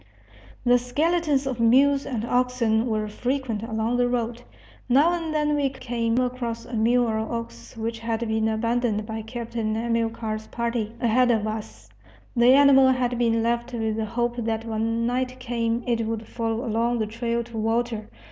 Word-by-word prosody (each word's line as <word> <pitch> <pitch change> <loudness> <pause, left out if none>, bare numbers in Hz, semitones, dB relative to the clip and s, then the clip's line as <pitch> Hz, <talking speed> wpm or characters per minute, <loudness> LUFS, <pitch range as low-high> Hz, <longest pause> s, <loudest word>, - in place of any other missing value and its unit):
The 245 0 +5
skeletons 295 +3 +1
of 260 -3 -3
mules 275 +4 +4
and 230 -4 -2
oxen 245 -2 +1
were 215 -2 -1
frequent 245 0 -2
along 225 +1 -1
the 245 0 +3
road. 240 -1 -2 0.5
Now 290 +8 +5
and 330 -2 -3
then 300 -1 +1
we 285 -2 +1
came 240 -3 -2
across 245 -2 -2
a 240 - -11
mule 235 +2 +3
or 220 -1 -1
ox 225 - -6
which 225 0 -3
had 230 0 -2
been 220 0 +1
abandoned 220 -1 0
by 220 0 -5
Captain 225 -1 -3
Amilcar's 225 -1 -2
party, 235 -2 -2
ahead 245 +2 +3
of 220 -3 +2
us. 160 - -6 0.5
The 240 +1 +6
animal 270 -1 +7
had 250 -2 0
been 230 -1 +2
left 235 +1 -1
with 220 -2 -1
the 220 0 -1
hope 240 +2 -2
that 225 -1 -2
when 225 +1 -1
night 255 +1 -1
came 235 -1 -1
it 230 -2 0
would 225 0 -3
follow 230 +1 -2
along 235 +1 0
the 220 - 0
trail 235 +2 -2
to 235 -1 -9
water. 225 0 -1
235 Hz, 170 wpm, -25 LUFS, 225-245 Hz, 0.5 s, animal